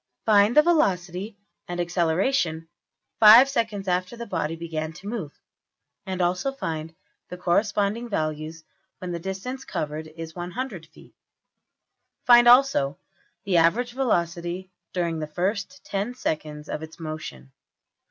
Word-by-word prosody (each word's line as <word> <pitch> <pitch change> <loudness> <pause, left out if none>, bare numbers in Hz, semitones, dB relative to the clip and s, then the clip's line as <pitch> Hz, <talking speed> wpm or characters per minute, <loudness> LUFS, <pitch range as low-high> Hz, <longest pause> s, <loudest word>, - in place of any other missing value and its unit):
Find 210 +3 +4
the 300 - +9
velocity 200 - 0 0.3
and 175 0 -5
acceleration 175 0 0 0.5
$5$~seconds 225 -3 +6
after 185 +5 -1
the 235 - -6
body 165 -6 -2
began 160 -1 -4
to 180 +5 -11
move, 205 -10 -5 0.7
and 185 -1 -1
also 180 +10 0
find 160 - -5 0.3
the 180 - -7
corresponding 205 +5 0
values 155 -2 -3 0.3
when 180 -1 -6
the 170 - -3
distance 195 +9 -5
covered 155 - -4
is 160 +1 -9
$100$~feet. 175 -2 -7 1.1
Find 240 -2 +7
also 245 - +5 0.5
the 190 -3 +1
average 215 +10 +3
velocity 175 -6 -1 0.2
during 170 -3 -1
the 155 - -4
first 200 - -3
$10$~seconds 155 -8 -3
of - - -4
its 160 +2 -10
motion. 155 - -7
180 Hz, 120 wpm, -25 LUFS, 160-220 Hz, 1.1 s, the